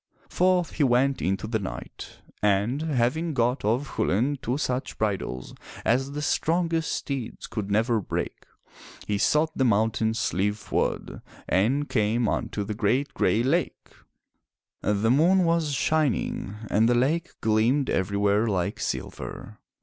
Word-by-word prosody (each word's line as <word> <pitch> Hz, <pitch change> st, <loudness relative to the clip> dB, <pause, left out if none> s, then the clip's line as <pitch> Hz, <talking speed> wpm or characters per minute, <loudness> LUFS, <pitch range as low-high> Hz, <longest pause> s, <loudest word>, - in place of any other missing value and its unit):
Forth 180 Hz, -1 st, +2 dB
he 155 Hz, -, 0 dB
went 130 Hz, +1 st, +2 dB
into 95 Hz, +3 st, -1 dB
the 110 Hz, 0 st, -1 dB
night, 95 Hz, -, -8 dB, 0.2 s
and, 105 Hz, +7 st, +1 dB
having 155 Hz, +2 st, 0 dB
got 120 Hz, +2 st, +1 dB
of 120 Hz, +7 st, 0 dB
Chulain 110 Hz, +6 st, +1 dB
two 125 Hz, +4 st, -1 dB
such 130 Hz, -3 st, -2 dB
bridles 95 Hz, -, -2 dB, 0.3 s
as 135 Hz, +4 st, +1 dB
the 150 Hz, +1 st, -3 dB
strongest 165 Hz, 0 st, 0 dB
steeds 135 Hz, -5 st, -4 dB
could 105 Hz, -3 st, -4 dB
never 110 Hz, +2 st, +2 dB
break, -, -, -4 dB, 0.6 s
he 105 Hz, -1 st, -1 dB
sought 155 Hz, +6 st, +2 dB
the 135 Hz, -, +1 dB
mountain 110 Hz, -1 st, +2 dB
Slieve 105 Hz, -1 st, 0 dB
Fuad, -, -, -2 dB, 0.3 s
and 130 Hz, +10 st, +2 dB
came 110 Hz, +1 st, +1 dB
unto 105 Hz, -, -2 dB
the 105 Hz, +2 st, -4 dB
great 125 Hz, +7 st, 0 dB
Gray 115 Hz, -, +2 dB
Lake. 165 Hz, +7 st, -1 dB, 0.9 s
The 105 Hz, +2 st, +1 dB
moon 175 Hz, +8 st, +4 dB
was 165 Hz, -3 st, +1 dB
shining 140 Hz, -8 st, 0 dB, 0.2 s
and 110 Hz, +3 st, +4 dB
the 120 Hz, -, +3 dB
lake 155 Hz, +8 st, 0 dB
gleamed 115 Hz, +6 st, +2 dB
everywhere 100 Hz, +3 st, +1 dB
like 90 Hz, -5 st, -1 dB
silver. -, -, -5 dB
120 Hz, 135 wpm, -26 LUFS, 105-145 Hz, 0.9 s, moon